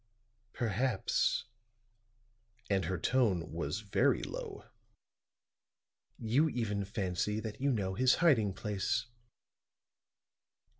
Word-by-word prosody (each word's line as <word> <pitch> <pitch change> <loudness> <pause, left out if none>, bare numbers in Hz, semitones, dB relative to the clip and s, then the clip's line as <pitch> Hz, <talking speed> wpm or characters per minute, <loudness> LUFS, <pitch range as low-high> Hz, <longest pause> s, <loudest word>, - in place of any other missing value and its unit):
"Perhaps," 115 -1 0 1.3
and 95 -1 +2
her 95 - -1
tone 95 -5 +1
was 85 +3 -3
very 100 -3 +2
low, - - -6 1.5
"you 125 +8 +2
even 105 -6 -2
fancy 100 +1 -1
that 110 +2 -6
you 140 0 +2
know 100 -6 -1
his 125 +5 +4
hiding 125 - +3
place." 105 +4 -1
105 Hz, 90 wpm, -33 LUFS, 95-120 Hz, 1.5 s, his